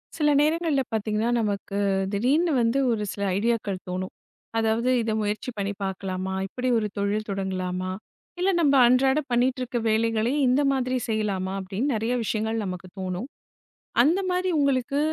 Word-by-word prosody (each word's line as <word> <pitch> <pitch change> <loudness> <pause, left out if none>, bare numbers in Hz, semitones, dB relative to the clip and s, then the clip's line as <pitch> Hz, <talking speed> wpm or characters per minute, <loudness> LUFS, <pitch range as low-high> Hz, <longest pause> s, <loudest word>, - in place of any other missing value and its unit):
சில 300 -2 +2
நேரங்கள்ல 310 -2 +2
பார்த்தீங்கன்னா 215 +1 0
நமக்குத் 200 -2 -1
திடீர்னு 280 - +2
வந்து 230 +4 +2
ஒரு 220 -2 -1
சில 200 - -7 0.2
ஐடியாக்கள் 215 -3 0
தோணும். 185 +1 -4 0.4
அதாவது 225 +2 +1
இதை 225 -1 -1
முயற்சி 210 +3 -2
பண்ணி 200 0 -2
பார்க்கலாமா? 190 -1 -3
இப்படி 250 +6 -4
ஒரு 215 -2 0
தொழில் 205 +2 -1
தொடங்கலாமா? 185 -1 -2 0.5
இல்ல, 370 +2 +2
நம்ம 290 -3 +4
அன்றாட 265 +3 +4
பண்ணிட்டு 250 +2 +2
இருக்கிற 245 -1 -2
வேலைகளே 225 +2 +1
இந்த 255 +3 +3
மாதிரி 255 -1 0
செய்யலாமா 200 -4 -1
அப்படின்னு 200 +9 -2
நிறைய 225 +3 -1
விஷயங்கள் 220 +1 -1
நமக்குத் 185 0 -7
தோணும். 185 +5 -3 0.8
அந்த 325 +8 +3
மாரி 365 +1 0
உங்களுக்கு 275 0 +1
220 Hz, 145 wpm, -25 LUFS, 195-255 Hz, 0.8 s, நம்ம